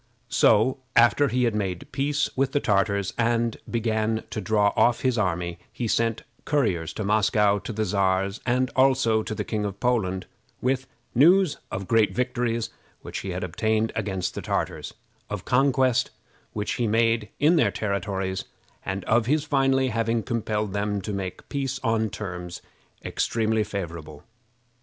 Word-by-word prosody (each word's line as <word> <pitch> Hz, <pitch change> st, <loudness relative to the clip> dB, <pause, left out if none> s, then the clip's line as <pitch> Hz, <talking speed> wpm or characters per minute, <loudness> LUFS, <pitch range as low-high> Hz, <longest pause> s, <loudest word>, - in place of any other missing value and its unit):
So, 115 Hz, +5 st, +4 dB, 0.2 s
after 120 Hz, +5 st, +5 dB
he 125 Hz, -1 st, +1 dB
had 115 Hz, -2 st, +2 dB
made 95 Hz, -4 st, -3 dB
peace 145 Hz, +1 st, 0 dB
with 135 Hz, 0 st, 0 dB
the 145 Hz, -, +3 dB
Tartars, 100 Hz, -3 st, +1 dB
and 115 Hz, 0 st, +1 dB
began 110 Hz, -1 st, 0 dB
to 110 Hz, -, -3 dB
draw 105 Hz, +1 st, +2 dB
off 120 Hz, 0 st, +3 dB
his 130 Hz, -2 st, +1 dB
army, 90 Hz, -5 st, -1 dB
he 120 Hz, -, -3 dB
sent 115 Hz, 0 st, 0 dB, 0.2 s
couriers 95 Hz, -, 0 dB
to 110 Hz, -, -4 dB
Moscow 105 Hz, 0 st, +3 dB
to 115 Hz, -, -6 dB
the 110 Hz, 0 st, -1 dB
Czars, 95 Hz, +1 st, 0 dB
and 125 Hz, +1 st, +1 dB
also 130 Hz, -4 st, +3 dB
to 110 Hz, -, -4 dB
the -, -, -2 dB
King 105 Hz, -2 st, -2 dB
in 100 Hz, -1 st, -2 dB
Poland, 100 Hz, -4 st, 0 dB, 0.3 s
with 130 Hz, +1 st, 0 dB, 0.3 s
news 170 Hz, +5 st, +5 dB
of 95 Hz, -1 st, -5 dB
great 115 Hz, -2 st, +3 dB
victories 120 Hz, -2 st, -1 dB, 0.3 s
which -, -, -5 dB
he 95 Hz, -, -6 dB
had 90 Hz, 0 st, -3 dB
obtained 110 Hz, +5 st, 0 dB
against 95 Hz, -4 st, -2 dB
the -, -, -5 dB
Tartars, -, -, -3 dB, 0.3 s
of 105 Hz, -3 st, -5 dB
conquests 130 Hz, -1 st, +2 dB, 0.4 s
which 105 Hz, -1 st, -2 dB
he 115 Hz, -, +2 dB
made 115 Hz, -1 st, +2 dB
in 155 Hz, +5 st, +5 dB
their -, -, +4 dB
territories, 95 Hz, -2 st, -2 dB, 0.4 s
and 95 Hz, -1 st, -4 dB
of 110 Hz, 0 st, +2 dB
his 150 Hz, +2 st, +2 dB
finally 135 Hz, -3 st, +2 dB
having 115 Hz, 0 st, 0 dB
compelled 110 Hz, -4 st, -2 dB
them 105 Hz, 0 st, -1 dB
to 105 Hz, +2 st, -4 dB
make 95 Hz, -2 st, -5 dB
peace 135 Hz, -2 st, -2 dB
on 115 Hz, -2 st, +1 dB
terms 90 Hz, -4 st, -6 dB, 0.4 s
extremely 110 Hz, -1 st, 0 dB
favorable. 85 Hz, -7 st, -6 dB
110 Hz, 155 wpm, -25 LUFS, 100-125 Hz, 0.4 s, after